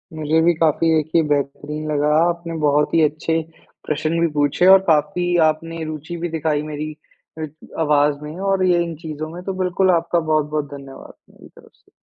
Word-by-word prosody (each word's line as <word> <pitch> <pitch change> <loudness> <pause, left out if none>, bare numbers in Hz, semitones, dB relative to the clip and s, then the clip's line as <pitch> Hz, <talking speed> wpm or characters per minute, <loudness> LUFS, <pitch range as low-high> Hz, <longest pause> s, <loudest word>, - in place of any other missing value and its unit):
मुझे 155 +1 +1
भी 170 +1 +4
काफ़ी 165 0 +2
देखिए 160 +2 +2
बेहतरीन 150 +2 -2
लगा। 145 0 +1 0.2
आपने 170 -1 -2
बहुत 150 0 +2
ही 165 - +4
अच्छे 155 +2 0 0.5
प्रश्न 155 +2 -1
भी 170 - +3
पूछे। 145 +3 +1
और 190 0 +9
काफ़ी 175 +3 +1
आपने 165 +1 -3
रुचि 155 +2 -6
भी 175 +1 -3
दिखाई 155 -2 -1
मेरी 150 +1 -5 0.4
अ, 160 - -2 0.4
आवाज़ 150 -1 +2
में। 150 +1 -7
और 195 -1 +1
ये 175 -1 +3
इन 170 -1 -5
चीज़ों 155 -1 -6
में, 175 +2 -8
तो 195 - -3
बिल्कुल 185 +1 +2
आपका 170 0 +1
बहुत-बहुत 155 -2 0
धन्यवाद 135 -1 -11 0.2
मेरी - - -17
तरफ - - -19
से। - - -32
155 Hz, 180 wpm, -20 LUFS, 150-170 Hz, 0.5 s, और